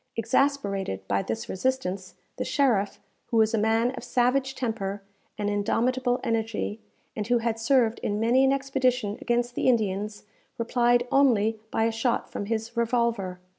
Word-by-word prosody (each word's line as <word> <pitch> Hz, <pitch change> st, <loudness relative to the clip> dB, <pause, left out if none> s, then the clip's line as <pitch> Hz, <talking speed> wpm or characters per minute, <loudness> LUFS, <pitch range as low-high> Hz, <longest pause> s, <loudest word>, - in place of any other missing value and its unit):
Exasperated 210 Hz, -, 0 dB
by 100 Hz, 0 st, +1 dB
this 110 Hz, +2 st, -4 dB
resistance, 190 Hz, -5 st, -2 dB, 0.2 s
the -, -, -1 dB
sheriff, 230 Hz, -8 st, +1 dB, 0.3 s
who 230 Hz, -, 0 dB
was 220 Hz, 0 st, +4 dB
a -, -, +2 dB
man 225 Hz, +3 st, +2 dB
of 260 Hz, -, -8 dB
savage 255 Hz, +2 st, +1 dB
temper 205 Hz, -6 st, -3 dB, 0.3 s
and 205 Hz, -1 st, -2 dB
indomitable 245 Hz, +5 st, +1 dB
energy, 225 Hz, -2 st, -2 dB, 0.3 s
and 210 Hz, -2 st, -3 dB
who 245 Hz, 0 st, +3 dB
had 230 Hz, -1 st, -1 dB
served 230 Hz, -1 st, +2 dB
in 205 Hz, 0 st, -2 dB
many 240 Hz, +4 st, +4 dB
an 270 Hz, -, +4 dB
expedition 255 Hz, -5 st, 0 dB
against 240 Hz, 0 st, 0 dB
the -, -, -1 dB
Indians, 210 Hz, -3 st, 0 dB, 0.3 s
replied 240 Hz, +1 st, +2 dB
only 225 Hz, -6 st, +3 dB
by 225 Hz, -, 0 dB
a 230 Hz, -, +2 dB
shot 225 Hz, +2 st, -1 dB
from 205 Hz, -, -4 dB
his 225 Hz, +1 st, -3 dB
revolver. 235 Hz, -6 st, 0 dB
230 Hz, 155 wpm, -26 LUFS, 205-250 Hz, 0.3 s, was